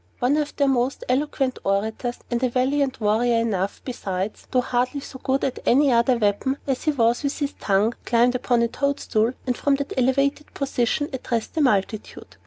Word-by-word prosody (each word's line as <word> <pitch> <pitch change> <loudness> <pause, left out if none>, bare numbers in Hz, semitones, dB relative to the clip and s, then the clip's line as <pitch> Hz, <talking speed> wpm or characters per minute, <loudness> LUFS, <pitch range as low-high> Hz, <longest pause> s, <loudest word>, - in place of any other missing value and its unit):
One 250 +4 +2
of 300 -1 -2
their 280 - +2
most 260 0 0
eloquent 265 0 0
orators 220 +5 -1
(and 240 0 0
a 255 - +2
valiant 265 +2 0
warrior 225 +3 +2
enough, 205 -4 -1
besides, 200 -5 -4
though 255 - +2
hardly 250 +3 -1
so 265 -1 -10
good 265 +1 0
at 260 - -1
any 275 +2 +4
other 235 +1 +3
weapon 220 +5 0
as 270 +1 -2
he 305 - +3
was 235 -4 +2
with 280 -1 -2
his 285 -1 -2
tongue) 205 +3 +2
climbed 240 +1 +3
upon 245 -1 +1
a - - +2
toadstool, 245 -4 0
and, 250 -2 0
from 285 +2 +2
that 280 0 -4
elevated 275 +3 0
position, 275 +1 0
addressed 235 -3 -3
the 320 - 0
multitude. 215 -4 -1
250 Hz, 185 wpm, -23 LUFS, 230-275 Hz, -, any